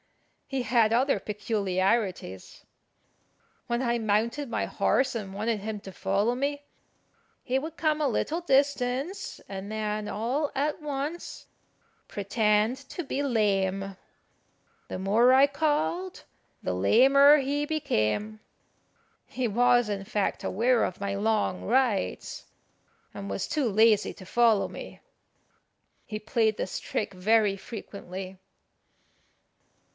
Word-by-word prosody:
He 270 -2 -2
had 225 -1 +3
other 255 +4 +2
peculiarities. 195 - -2 1.0
When 235 +1 -1
I 240 -2 0
mounted 230 +6 0
my - - -1
horse 260 -2 +1
and 200 -4 -5
wanted 215 +2 -1
him 210 +1 -5
to 190 - -10
follow 200 +6 0
me, 285 +2 -2 0.8
he 260 0 0
would 315 +4 -5
come 310 -1 +1
a 295 - +2
little 310 +7 -1
distance, 275 +2 0
and 195 +1 -6
then 215 -1 -2
all 255 +8 -1
at 295 +3 -1
once 295 +3 -5 0.6
pretend 210 +3 +1
to 350 - -5
be 280 0 -2
lame. 195 -5 0 0.9
The - - -4
more 215 +6 +4
I 270 +1 +7
called 315 +5 -1 0.4
the 90 - -1
lamer 275 - +6
he 285 +1 -1
became. 215 - -1 0.9
He 255 -2 -2
was, 245 +2 +3
in 200 -2 -3
fact, 200 +1 -2
aware 235 +4 +2
of 185 - -3
my 200 0 -2
long 210 -2 0
rides, 240 -4 0 0.7
and 200 0 -7
was - - -3
too 290 -5 0
lazy 220 0 +4
to 185 - -12
follow 225 0 +3
me. - - -9 1.1
He 215 - -5
played 220 0 +1
this - - -3
trick 205 - -3
very 205 +2 +2
frequently. 190 -2 -8
225 Hz, 120 wpm, -27 LUFS, 200-270 Hz, 1.1 s, I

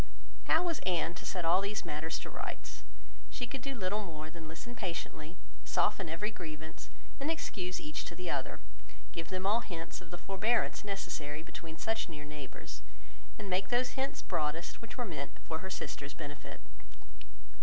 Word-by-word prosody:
How 320 +2 +7
was 340 -4 +2
Anne 175 -2 +3
to - - -5
set 180 -3 +1
all 175 +3 +8
these 205 +2 +1
matters 160 +2 +1
to - - -3
rights? - - -3 0.5
She 245 - 0
could 265 +1 -3
do 275 +1 -1
little 205 0 +2
more 155 -4 -4
than 165 -1 -6
listen 165 +10 -5
patiently, 170 -5 -2 0.3
soften 190 -5 +4
every 185 +7 +1
grievance, 160 -4 -5 0.3
and 280 +3 +2
excuse 185 - 0
each 150 0 -1
to 170 - -4
the 180 +1 -3
other; 135 -5 +1 0.5
give 165 -1 -2
them 185 0 0
all 210 +4 +7
hints 170 -8 -3
of 175 - -10
the 175 - -3
forbearance 200 +6 +3
necessary 160 -7 -1
between 160 -1 -6
such 225 -1 +2
near 150 -2 -5
neighbours, 145 -2 -6 0.6
and 210 - -4
make 190 +1 +3
those 250 +1 +5
hints 270 +1 0
broadest 165 -1 +1
which 230 +2 -7
were 245 - +2
meant 155 -8 -3
for 160 -1 -1
her 190 - -3
sister's 140 -6 -2
benefit. 145 -3 -5
180 Hz, 175 wpm, -36 LUFS, 160-210 Hz, 0.6 s, all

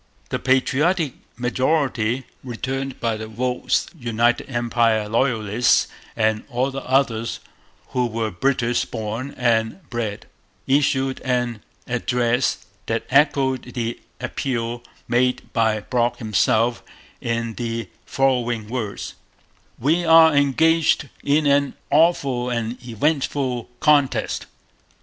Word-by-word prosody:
The - - -2
patriotic 140 +4 +2 0.2
majority, 130 -1 0 0.2
returned 135 +2 -4
by 115 -2 -1
the 110 0 -6
votes 125 +3 0
of 155 -8 -18
United 120 +2 +1
Empire 115 -3 +1
Loyalists 115 -1 +2 0.3
and 110 -1 +1
all 130 +1 -1
others 130 -4 0 0.5
who 125 -1 0
were 110 -1 -2
British 120 +4 +1
born 115 +4 -5
and 120 +6 0
bred, 110 -4 -3 0.4
issued 135 -1 +1
an 125 -3 -1 0.2
address 125 0 0 0.2
that 115 0 -1
echoed 135 -3 +2
the 115 -1 -2 0.2
appeal 120 -2 -3 0.3
made 125 +1 0
by 110 -2 +2
Brock 120 +1 0
himself 110 +2 +1 0.4
in 115 -1 -2
the 115 0 -4 0.2
following 120 -5 0
words: 110 -5 -4 0.6
'We 160 +8 +1
are 160 -1 +7
engaged 150 +1 +3
in 150 +2 +2
an 140 -1 +2 0.2
awful 140 -6 +3
and 115 0 -3
eventful 130 0 -1
contest. 145 -3 +2
125 Hz, 105 wpm, -22 LUFS, 115-135 Hz, 0.6 s, are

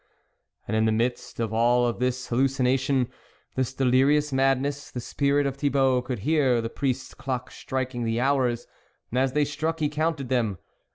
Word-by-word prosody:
And 110 - -1
in 110 0 +3
the 110 - +3
midst 120 +3 -2
of 110 -2 -1
all 120 +1 +3
this 125 +1 -2
hallucination, 130 0 +2 0.5
this 130 -1 -1
delirious 135 +3 +3
madness, 135 +1 +1
the 125 - -5
spirit 140 +3 +1
of 135 -1 -2
Thi 145 0 +1
bault 130 -2 +2
could 125 -3 -3
hear 145 -6 +3
the 115 0 -3
priest's 130 -2 -2
clock 130 -2 -4
striking 130 -2 -3
the 115 0 0
hours, 125 -3 +1 0.5
and 125 - +1
as 130 0 +1
they 150 0 +3
struck 160 +3 -2
he 150 -2 +1
counted 150 -3 -1
them. 115 -7 0
130 Hz, 170 wpm, -26 LUFS, 120-140 Hz, 0.5 s, in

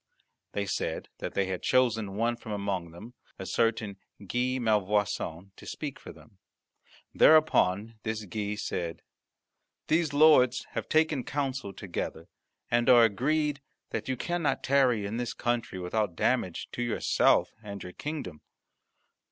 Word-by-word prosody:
They 100 - -1
said 95 - -3
that - - -5
they 100 - +2
had 95 -1 -4
chosen 115 -6 +1
one 115 +3 +1
from 115 -2 -7
among 100 -4 -2
them, 105 +9 -11 0.2
a - - -6
certain 110 -3 0 0.3
Guy 125 +5 0
Malvoisin, 105 -5 0
to - - -14
speak - - -5
for - - -10
them. - - -18 0.7
Thereupon 115 -9 +4
this 110 -1 -3
Guy 105 +2 -3
said, 85 -5 -4 0.9
"These 160 -1 +2
lords 145 -5 +5
have - - -4
taken 155 -4 +2
counsel 135 -7 -3
together, 90 -3 -5 0.4
and 120 0 +3
are 120 -2 +8
agreed 145 +7 +1 0.3
that - - -4
you 130 - -1
cannot 175 +2 -1
tarry 130 -6 +3
in 105 +3 -3
this 120 -1 -3
country 120 -5 -2
without 90 +1 -1
damage - - 0
to - - -5
yourself 120 -1 +2
and 100 -3 -7
your 90 - -8
kingdom. 145 - -6
115 Hz, 140 wpm, -29 LUFS, 100-130 Hz, 0.9 s, are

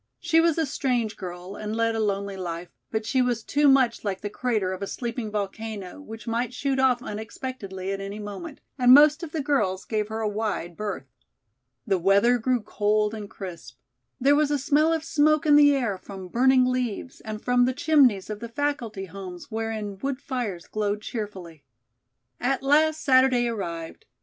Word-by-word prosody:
She 330 -1 +3
was 335 -1 +2
a 325 - +2
strange 250 -6 -1
girl 180 +1 -7
and 215 +1 -4
led 230 0 +1
a 225 - -2
lonely 200 -2 -1
life, 175 -2 -5 0.2
but 220 -1 -2
she 260 +2 +2
was 240 -3 0
too 290 +4 +2
much 265 -4 +4
like 195 -3 -3
the 205 - -4
crater 215 -6 -1
of 185 - -7
a 200 - -3
sleeping 235 -1 -4
volcano, 210 +1 -5
which 225 -5 -10
might 235 +1 -2
shoot 270 0 -1
off 255 -2 +3
unexpectedly 215 -4 -6
at 195 0 -3
any 200 +1 -6
moment, 210 - -7 0.2
and 250 0 +8
most 300 +2 +6
of 335 -3 -6
the 315 -3 -2
girls 210 -10 0
gave 215 -2 -1
her 220 +1 -4
a 220 - 0
wide 210 -5 -3
berth. 205 -8 -4 0.8
The 190 - +1
weather 200 +7 +4
grew 250 +1 +1
cold 210 0 0
and 210 -2 -7
crisp. 170 - -9 0.4
There 280 +3 +4
was 300 0 +2
a 295 - +1
smell 295 +4 +2
of 325 -1 0
smoke 305 0 +2
in 295 -1 +6
the 290 -1 +7
air 230 -8 -1
from 190 -2 -9
burning 255 +4 +4
leaves 255 -1 -2
and 215 -1 -5
from 245 +1 +3
the 255 - +1
chimneys 260 -9 +3
of 210 - -5
the 235 +1 -7
faculty 235 -6 -2
homes 185 +1 -9
wherein 220 -3 -4
wood 270 +3 -2
fires 245 -11 -4
glowed 210 -1 -2
cheerfully. 190 - -6 0.8
At 265 +2 0
last 310 +3 +3
Saturday 260 -2 +4
arrived. 170 -8 -5
225 Hz, 185 wpm, -25 LUFS, 200-265 Hz, 0.8 s, and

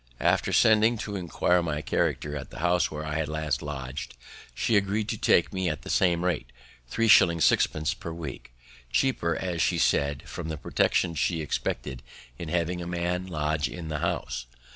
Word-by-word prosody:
After - - +2
sending 110 +2 +5
to 105 -1 -5
inquire 90 -1 +1
my 75 -3 -3
character 75 0 -1
at 75 - -6
the - - -12
house 90 +2 +2
where 75 0 -5
I 75 +1 -1
last 75 -2 -2
lodg'd 70 -2 -6 0.4
she 115 - +1
agreed 100 +1 +1
to 110 - -2
take 85 - +3
me 95 -1 -1
in 80 - +1
at 75 - -12
the - - -5
same 90 -1 +2
rate, 75 -9 -1 0.4
3s. 115 - +1 0.3
6d. 75 -1 +2
per 85 - -6
week; 80 -7 -7 0.4
cheaper, 85 -11 +1
as 90 -3 -2
she 85 - +2
said, 70 -3 +1
from 80 -2 -6
the 80 - -3
protection 85 +3 +1
she 80 +2 0
expected 60 -3 -3 0.4
in 85 - -5
having 90 +1 -1
a 85 - -5
man 90 +1 -2
lodge 75 -3 -1
in 85 -3 -7
the 75 -1 -2
house. 60 -7 -2
85 Hz, 180 wpm, -27 LUFS, 75-90 Hz, 0.4 s, sending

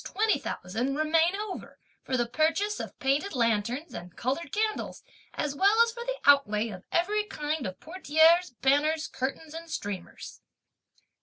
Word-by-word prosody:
20,000 275 - -1
remain 325 +3 +3
over, 415 -1 -6 0.3
for 260 - -1
the 240 - +1
purchase 320 - 0
of - - -7
painted 280 +7 0
lanterns, 235 +5 0
and 175 0 -9
coloured 275 +5 -2
candles, 430 0 -2 0.3
as 295 -2 -2
well 400 +8 +4
as 465 - -1
for 470 +1 -7
the - - -3
outlay 230 -6 +4
for 185 -1 -9
every 415 +5 +1
kind 300 - -3
of 185 0 -8
portieres, 330 +1 +3
banners, 305 +4 +2
curtains 285 +4 -4
and 330 +1 -8
streamers." 200 - -6
310 Hz, 145 wpm, -28 LUFS, 255-370 Hz, 0.3 s, well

